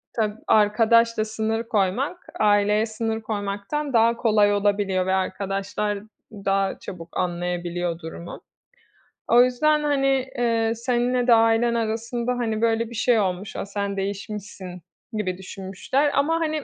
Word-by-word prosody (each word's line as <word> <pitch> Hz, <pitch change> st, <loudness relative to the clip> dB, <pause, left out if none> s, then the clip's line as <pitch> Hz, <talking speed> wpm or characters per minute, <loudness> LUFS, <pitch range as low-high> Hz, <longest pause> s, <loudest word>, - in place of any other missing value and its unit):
ta 215 Hz, -2 st, -1 dB
arkadaşla 220 Hz, +1 st, +4 dB
sınır 220 Hz, +1 st, -2 dB
koymak, 230 Hz, -, 0 dB, 0.2 s
aileye 210 Hz, +1 st, +3 dB
sınır 225 Hz, 0 st, -3 dB
koymaktan 210 Hz, +7 st, -3 dB
daha 230 Hz, 0 st, +4 dB
kolay 210 Hz, -3 st, +3 dB
olabiliyor 200 Hz, -2 st, +1 dB
ve 190 Hz, -, +1 dB
arkadaşlar 195 Hz, +2 st, -2 dB, 0.3 s
daha 195 Hz, -1 st, -1 dB
çabuk 170 Hz, -2 st, -9 dB
anlayabiliyor 175 Hz, -1 st, -2 dB
durumu. 170 Hz, +1 st, -8 dB, 0.9 s
O 240 Hz, +1 st, +7 dB
yüzden, 300 Hz, +5 st, +2 dB
hani, 270 Hz, -2 st, +1 dB
eee, 230 Hz, -2 st, +1 dB
seninle 245 Hz, +1 st, 0 dB
de 240 Hz, -, +7 dB
ailen 225 Hz, +1 st, +4 dB
arasında, 230 Hz, +2 st, -2 dB
hani, 230 Hz, -3 st, -1 dB
böyle 230 Hz, 0 st, +1 dB
bir 235 Hz, -, -9 dB
şey 225 Hz, 0 st, +3 dB
olmuş. 190 Hz, 0 st, -2 dB
"A! -, -, -3 dB
Sen 200 Hz, 0 st, -3 dB
değişmişsin." 195 Hz, -2 st, -5 dB, 0.3 s
gibi 185 Hz, -4 st, -2 dB
düşünmüşler 195 Hz, +10 st, -2 dB
ama 310 Hz, +4 st, +2 dB
hani 310 Hz, -2 st, -1 dB
215 Hz, 130 wpm, -24 LUFS, 195-235 Hz, 0.9 s, O